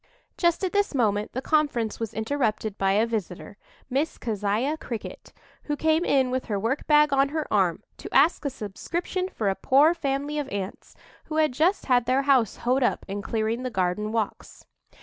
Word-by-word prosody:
Just 345 +1 +1
at 370 - -1
this 405 -6 +1
moment 210 -4 0
the 260 - -4
conference 285 -8 0
was 225 -2 -4
interrupted 220 -3 -1
by 195 0 +2
a 215 +3 +3
visitor, 205 -3 -5 0.3
Miss 275 +5 -1
Keziah 215 +6 -1
Cricket, 235 -7 -7 0.3
who 295 - -1
came 315 +2 +2
in 265 -6 +2
with 255 0 -2
her 205 - -2
work 230 +7 -2
bag 300 -1 +5
on 275 0 +3
her 310 0 -2
arm 185 -5 +2
to - - -9
ask 300 +6 +4
a 285 - 0
subscription 340 - -4
for 220 - -3
a 195 - +3
poor 285 - +4
family 285 -2 -2
of 285 -2 -4
Ants 195 -2 -6 0.3
who 310 - -6
had 310 -2 +3
just 325 +10 +1
had 245 -2 +2
their 260 +2 +2
house 265 -5 +3
hoed 255 +3 +2
up 245 - 0
in 200 +1 -4
clearing 220 +3 -1
the 255 - -3
garden 190 +1 -1
walks. 220 -2 -4
255 Hz, 190 wpm, -25 LUFS, 215-295 Hz, 0.3 s, bag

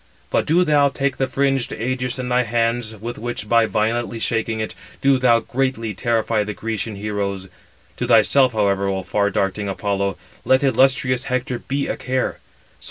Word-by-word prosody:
But - - +1
do 170 +4 +4
thou 145 -4 +4
take 140 0 -2
the 135 - 0
fringed 135 -1 0
ægis 125 +2 -2
in 130 -1 -4
thy 125 0 +2
hands, 115 -1 -1
with 115 +3 -7
which, 120 -2 -4
by 115 0 +4
violently 115 +2 -1
shaking 115 0 -1
it, 110 - -3 0.3
do 135 -1 +3
thou 120 -2 +4
greatly 125 -4 -2
terrify 110 +2 0
the 105 0 -5
Grecian 110 -1 -3
heroes. 100 -2 -3 0.5
To - - -2
thyself, 130 -3 +5
however, 100 -2 +1
O 95 -1 -2
far 100 +2 0
darting 100 +1 -1
[Apollo], 100 -1 -1 0.3
let 130 +1 +3
illustrious 130 -1 +2
Hector 125 0 -2
be 140 +1 -2
a - - -3
care. 130 0 -2
115 Hz, 165 wpm, -21 LUFS, 105-130 Hz, 0.5 s, thyself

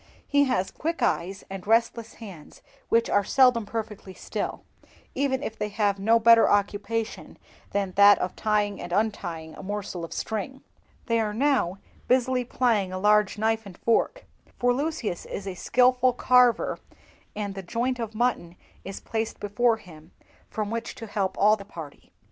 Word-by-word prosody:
He 285 0 +3
has 190 -8 0
quick 330 +2 -3
eyes 190 +3 -1
and 195 0 -8
restless 230 0 +1
hands, 190 -9 -12 0.3
which 230 0 +3
are 205 - +2
seldom 250 -1 +3
perfectly 210 -4 -6
still, - - -5 0.5
even 270 0 0
if 225 - -6
they 210 - -2
have 200 -1 0
no 225 +4 +4
better 230 0 +6
occupation 205 +2 -1 0.3
than 200 -2 -1
that 205 0 +8
of 180 - -3
tying 210 -2 0
and 175 - -7
untying 175 -6 -2
a - - -10
morsel 195 -3 -5
of 165 - -7
string; 220 +3 -3
but 270 - -19 0.4
they 230 -1 +1
are 210 -2 -1
now 255 -8 +1 0.3
busily 255 0 +2
plying 230 -6 0
a 185 - -4
large 210 +1 +3
knife 220 +1 0
and 185 -2 -12
fork, 480 - 0 0.3
for 245 0 +2
Lucius 270 - -3
is 200 - -6
a 195 - -4
skilful 250 +5 +3
carver, 250 -1 +3 0.6
and 205 -1 -3
the 195 - -6
joint 240 +6 -2
of 225 -2 -5
mutton 215 -7 -1 0.3
is 195 - -7
placed 225 0 -3
before 225 +3 +1
him, 165 -6 -15 0.4
from 215 -1 -3
which 230 0 -4
to 225 - -8
help 195 -3 -2
all 210 +2 +5
the 200 - -10
party. 165 -7 -11
215 Hz, 165 wpm, -26 LUFS, 195-240 Hz, 0.6 s, that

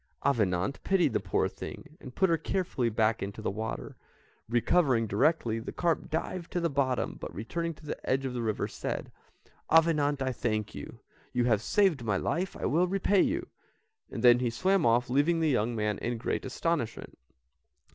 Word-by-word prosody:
Avenant 105 -4 +1
pitied 175 - +2
the - - +2
poor - - 0
thing, 155 -1 -9
and 130 - -10
put 190 - +3
her 165 -2 +2
carefully 155 -7 -1
back 110 0 +1
into 100 +2 -5
the 110 - -2
water. 110 +2 -5 0.5
Recovering 120 0 +3
directly, 115 +2 +1
the 115 - -6
carp 170 -2 -1
dived 165 +2 -3
to 175 - +1
the 170 -2 0
bottom, 135 -3 0
but - - -5
returning 165 +10 -3
to 155 - -16
the - - -5
edge 135 +1 +1
of 130 - -3
the 120 - -2
river, 110 -2 -1
said, - - -5 0.6
"Avenant, 150 -3 +4
I 130 -1 0
thank 110 -4 -2
you; 70 - -9 0.3
you 125 - +2
have 115 -4 +2
saved 175 - +2
my 105 -4 +1
life, 180 - -2
I - - -4
will 175 +5 +2
repay 195 +1 +2
you;" 335 +6 0 0.6
then 120 -1 +5
she 125 -1 0
swam 185 +8 +2
off 120 +2 +3
leaving 145 +7 +2
the 160 -1 +2
young 120 -3 +1
man 105 -2 -1
in 120 0 -2
great 115 - -2
astonishment. 135 -3 -2
130 Hz, 180 wpm, -29 LUFS, 115-165 Hz, 0.6 s, then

